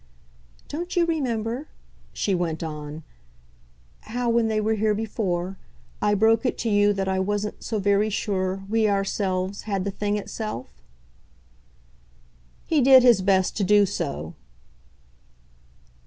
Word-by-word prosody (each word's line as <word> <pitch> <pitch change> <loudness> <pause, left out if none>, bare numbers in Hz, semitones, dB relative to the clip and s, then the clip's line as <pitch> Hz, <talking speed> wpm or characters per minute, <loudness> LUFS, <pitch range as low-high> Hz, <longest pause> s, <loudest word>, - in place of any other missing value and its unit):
"Don't 345 +4 -5
you 350 -1 +4
remember," 255 -4 -2 0.4
she 200 - -1
went 170 -3 -1
on, 150 0 -6 1.0
"how, 240 +1 -1
when 230 -1 +2
they 220 -1 0
were 215 +1 +1
here 215 0 +1
before, 195 -4 -3 0.4
I 205 0 +2
broke 225 +2 +3
it 250 - -1
to 235 - -2
you 205 0 +4
that 195 -1 -2
I 190 0 0
wasn't 205 +2 -2
so 220 - -2
very 205 +1 +2
sure 195 -2 -2
we, 220 0 +2
ourselves 195 -1 -1
had 195 -2 0
the 200 - -2
thing 205 +1 -1
itself?" 210 - -5 1.9
He 310 -3 +2
did 260 0 +7
his 240 -6 +6
best 190 -1 +2
to 205 - +1
do 205 +1 +5
so. 85 - -4
205 Hz, 135 wpm, -24 LUFS, 190-225 Hz, 1.9 s, did